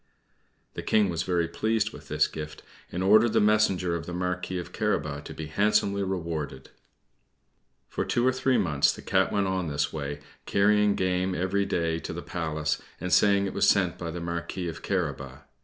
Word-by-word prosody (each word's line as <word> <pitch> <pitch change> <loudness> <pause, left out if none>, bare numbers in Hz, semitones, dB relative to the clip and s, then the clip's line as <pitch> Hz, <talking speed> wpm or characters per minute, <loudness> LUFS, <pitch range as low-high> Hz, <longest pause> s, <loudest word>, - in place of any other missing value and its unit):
The - - -5
King 105 -3 +2
was 85 -2 -1
very 85 -2 0
pleased 110 +4 0
with - - -12
this - - +2
gift, 75 0 -8 0.3
and 90 +2 -2
ordered 110 +4 +5
the - - +4
messenger 105 -4 +3
of 85 - -5
the 90 - -5
Marquis 90 0 -2
of 90 - -6
Carabas 75 0 -1
to - - -7
be 80 - -5
handsomely 100 +4 +1
rewarded. 80 -8 -4 1.2
For - - -2
two 120 - 0
or 130 - +5
three 130 0 +1
months 75 -5 +3
the - - -10
Cat - - +2
went 100 -1 +1
on 95 -1 -1
in 80 - -4
this 70 0 -1
way, 70 -1 -4 0.3
carrying 105 0 +3
game 90 0 0
every 100 +2 0
day 80 -1 0
to - - -6
the - - -6
Palace, 80 -3 -2 0.2
and 90 +1 -2
saying 100 -1 +4
it 95 - -3
was - - +3
sent 95 -4 +2
by 85 - -4
the 85 +2 -5
Marquis 85 +1 -4
of 85 0 -6
Carabas. 70 -7 -3
90 Hz, 190 wpm, -27 LUFS, 80-100 Hz, 1.2 s, ordered